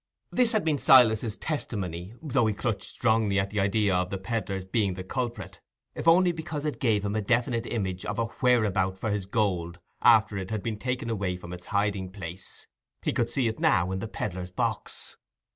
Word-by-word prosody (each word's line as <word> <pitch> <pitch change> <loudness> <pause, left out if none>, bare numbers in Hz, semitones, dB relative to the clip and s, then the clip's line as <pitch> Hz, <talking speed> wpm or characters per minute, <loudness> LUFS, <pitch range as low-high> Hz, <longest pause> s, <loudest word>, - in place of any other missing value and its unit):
This 245 -2 +3
had 215 -5 +1
been 150 -3 +1
Silas's 115 -4 +5
testimony, 95 - -4
though 135 -6 +2
he 105 - 0
clutched 110 -1 -2
strongly 110 -4 +2
at 95 0 -1
the 105 - -1
idea 100 0 +2
of 90 0 +1
the 95 - -3
pedlar's 95 -2 -3
being 100 -1 0
the 95 - -6
culprit, 105 -4 -4 0.3
if - - -5
only 175 +2 +6
because 160 -3 -5
it 150 - -2
gave 110 -6 +1
him 100 +1 -1
a 110 - +1
definite 120 +2 0
image 95 -5 -2
of 105 - -3
a 115 - +1 0.2
whereabout 105 -7 +2
for 110 +2 -2
his 100 -2 -2
gold 90 -6 0 0.2
after 110 -4 +5
it 95 0 -5
had 110 -2 -3
been 110 -2 -3
taken 125 -1 -2
away 95 -4 -1
from 90 -1 -9
its 90 0 -9
hiding 100 -2 0
place: 95 -2 -8 0.4
he - - 0
could 120 -1 0
see 125 0 0
it 110 - -3
now 90 -1 +3
in 95 - -2
the 115 - -4
pedlar's 90 -4 -4
box. 90 - -3
105 Hz, 200 wpm, -27 LUFS, 95-120 Hz, 0.4 s, only